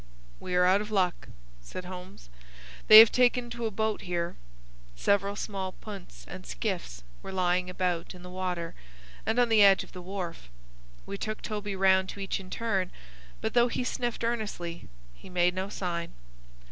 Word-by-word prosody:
"We 180 - -4
are 180 0 +5
out 190 +3 +4
of 210 - -6
luck," 185 -4 0 0.3
said 120 - -8
Holmes. 180 - -10 0.6
"They 215 - +11
have 220 0 +11
taken 245 -1 +2
to 235 -1 -2
a - - -1
boat 220 +1 -1
here." 175 -2 -3 0.6
Several 200 - +1
small 195 -3 -4
punts 185 - -10
and - - -8
skiffs - - -4 0.2
were - - -7
lying 180 -1 +1
about 180 -1 -2
in 180 - -12
the 180 - -9
water 180 -2 -3 0.5
and 225 - +1
on 245 -1 +4
the 220 -2 +5
edge 195 -1 +7
of - - -15
the 180 - -9
wharf. 180 - -6 0.6
We 200 - -6
took 215 0 -4
Toby 205 -2 -3
round 190 0 +4
to - - -7
each 195 0 -2
in 185 -1 -11
turn, 195 -4 -1 0.5
but, - - -2
though 240 0 +5
he 250 - -2
sniffed 240 -2 -2
earnestly, 210 -8 -3 0.3
he - - -14
made 180 0 +2
no 190 +2 -3
sign. 170 -4 -4
190 Hz, 175 wpm, -29 LUFS, 180-210 Hz, 0.6 s, They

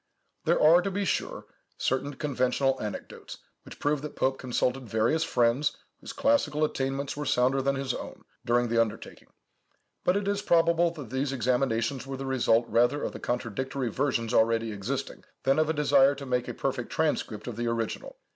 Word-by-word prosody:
There - - +3
are, 165 +3 +6
to 195 - -2
be 200 +1 -2
sure, - - -2 0.3
certain 135 +2 -1
conventional 135 -1 0
anecdotes, 105 -1 -7 0.3
which - - -12
prove 145 -1 0
that 150 - -7
Pope 135 0 0
consulted 125 0 -1
various 115 +10 +2
friends, 125 +4 +1 0.2
whose - - -8
classical 275 - +1
attainments 135 -1 -1
were 145 - -4
sounder 130 0 +2
than 140 +1 +1
his 135 -2 -2
own, - - -8 0.2
during 120 +1 +2
the 115 0 +3
undertaking; 110 -2 -5 0.8
but 180 +2 +3
it 200 -1 -2
is 200 0 0
probable 170 -1 +3
that 145 -9 -9
these 130 +1 -1
examinations 130 0 0
were 135 0 -5
the 135 - -5
result 125 -3 +2
rather 120 +6 +2
of - - -2
the - - -8
contradictory 125 +2 -3
versions 120 -2 -1
already 115 0 +2
existing, 130 +7 -4 0.2
than 135 +2 +3
of 155 0 +2
a - - +4
desire 140 -2 +4
to 140 0 -8
make 125 -1 -1
a - - -5
perfect 130 -3 -2
transcript 150 -9 -1
of 120 - -5
the 120 +1 -2
original. 115 - -3
135 Hz, 180 wpm, -28 LUFS, 120-145 Hz, 0.8 s, are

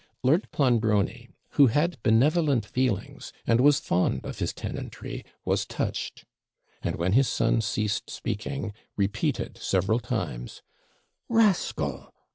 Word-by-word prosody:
Lord 155 +9 +3
Clonbrony, 115 -2 +1 0.2
who 140 - +6
had 150 +3 +1
benevolent 135 - +3
feelings, 125 -2 -2
and 115 +1 +3
was 145 +1 +6
fond 85 -7 0
of - - -6
his - - 0
tenantry, - - -6 0.2
was - - +1
touched; - - -4 0.6
and, - - -2
when 85 +3 0
his 135 +2 +4
son 115 0 +2
ceased 105 -1 -1
speaking, 105 +1 -4 0.2
repeated 100 +1 -1
several 100 +5 +1
times 90 - -4 0.7
'Rascal! 225 -6 +1
115 Hz, 115 wpm, -27 LUFS, 105-140 Hz, 0.7 s, who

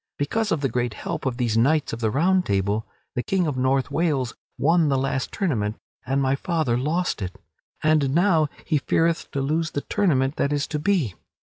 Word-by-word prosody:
Because 215 +10 -1
of 160 - +1
the 135 - +2
great 120 -2 -2
help - - -4
of 125 -2 -2
these 120 -4 0
knights 145 +4 +2
of 115 - -4
the 110 -2 +1
Round 180 - +3
Table, 100 - 0 0.3
the 125 - -1
King 185 +8 0
of 150 -4 -1
North 130 +1 +1
Wales 145 -7 0 0.2
won 165 0 +3
the 135 - +2
last 135 0 -1
tournament 115 - -1 0.3
and 135 +2 +1
my 135 0 +2
father 155 -6 0
lost 155 +7 -1
it, 90 -1 -5 0.4
and 155 -3 +3
now 170 -4 +4 0.2
he 155 -4 +1
feareth 165 +3 +1
to 140 - -2
lose 155 +4 0
the 145 - -3
tournament 145 -9 +1
that 140 - +1
is 145 -1 0
to 150 - -2
be. 155 - +1
140 Hz, 200 wpm, -24 LUFS, 125-165 Hz, 0.4 s, now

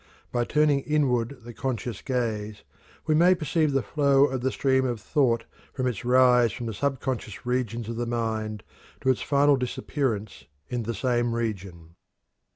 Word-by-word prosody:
By 120 0 0
turning 150 0 +3
inward 135 -4 0
the 120 0 -9
conscious 120 -3 -4
gaze 110 -5 -3 0.4
we 155 - +2
may 175 +4 +5
perceive 155 -1 0
the 135 -2 +1
flow 140 -2 +3
of 130 -3 -2
the 130 +1 0
stream 130 0 +2
of 120 -3 -2
thought 120 -1 +1 0.3
from 130 - -2
its 125 -3 -2
rise 125 -1 +5
from 120 - -6
the 115 - -3
subconscious 130 -3 -3
regions 120 -2 -2
of 115 0 -5
the 120 0 -2
mind 110 -3 -2 0.4
to 130 - +3
its 130 - -2
final 145 0 +3
disappearance 120 -4 -3 0.2
in 120 -1 -2
the 115 +1 -3
same 120 +1 0
region. 95 -8 -5
125 Hz, 160 wpm, -26 LUFS, 115-135 Hz, 0.4 s, may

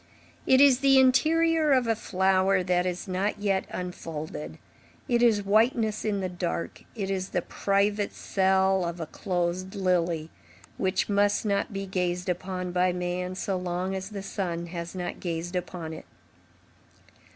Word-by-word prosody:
It 260 - +6
is 275 -3 +6
the 270 -1 +5
interior 315 +4 +4
of 255 -2 +4
a 225 -1 +1
flower 190 -2 +2
that 180 0 +1
is 180 +1 -4
not 190 +3 -1
yet 200 -2 0
unfolded, 155 - -6 0.5
it 240 -1 +2
is 215 -4 +3
whiteness 220 +1 +2
in 205 -2 -1
the 185 - -1
dark, 85 - -4
it 195 -3 -3
is 190 -1 -2
the 180 - 0
private 200 +1 0
cell 190 -1 +2
of 170 0 -4
a 165 - -3
closed 180 +2 -2
lily, 175 -4 0 0.5
which 190 0 0
must 205 +1 +2
not 200 0 0
be 195 -1 -4
gazed 180 -1 -2
upon 180 0 -3
by 180 +1 +2
man 180 +1 -3
so 195 +1 -2
long 180 +1 -2
as 190 0 -4
the 200 -2 -6
sun 175 -4 -3
has 170 +1 -6
not 180 -1 -4
gazed 175 0 -4
upon 175 -2 -4
it. - - -9
190 Hz, 155 wpm, -27 LUFS, 180-205 Hz, 0.5 s, It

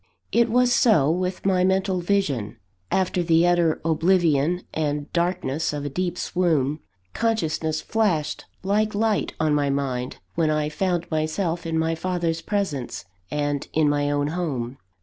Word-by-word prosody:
It 235 0 +3
was 245 +1 +3
so 200 - +4
with 180 +2 -2
my 185 -2 +3
mental 190 0 +1
vision. 170 - 0 0.3
After 185 -1 +1
the 165 0 +4
utter 175 -2 +3
oblivion 165 0 +2
and 150 -2 -2
darkness 170 -4 0
of 145 -1 -4
a - - -2
deep 180 +4 -2
swoon, 155 -6 0 0.3
consciousness 165 -9 0
flashed 175 -9 0 0.2
like 210 +2 +1
light 215 0 +1
on 155 -1 +2
my 145 -1 +2
mind, 130 -2 -2 0.2
when 160 - +1
I 150 -1 0
found 175 +1 -1
myself 165 +2 -1
in 165 0 -1
my 160 0 +1
father's 165 -1 -1
presence, 155 - -3 0.2
and 145 -1 -2
in 155 -1 +3
my 145 0 +1
own 145 0 0
home. 135 -7 -3
165 Hz, 150 wpm, -24 LUFS, 150-185 Hz, 0.3 s, so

